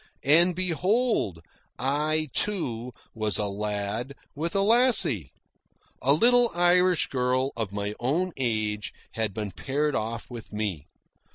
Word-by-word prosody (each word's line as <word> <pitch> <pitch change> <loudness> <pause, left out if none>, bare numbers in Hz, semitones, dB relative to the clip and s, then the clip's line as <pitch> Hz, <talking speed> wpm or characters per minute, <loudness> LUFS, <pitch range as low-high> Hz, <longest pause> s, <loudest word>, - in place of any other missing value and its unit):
And 170 +5 +5
behold, 185 - 0 0.3
I, 150 +3 0
too, 125 - -1 0.2
was 110 -2 +2
a 105 - 0
lad 105 +5 -3 0.2
with 165 +5 -4
a 195 - +3
lassie. 210 - +3 0.7
A 135 - +2
little 240 +9 +4
Irish 175 0 +4
girl 130 +1 0
of 110 -4 -3
my 100 0 -3
own 165 +10 0
age 110 -4 -2 0.2
had 110 -2 -1
been 105 0 -5
paired 145 +9 -1
off 115 +2 -3
with 120 -3 -10
me. 105 -9 -3
130 Hz, 125 wpm, -26 LUFS, 105-175 Hz, 0.7 s, And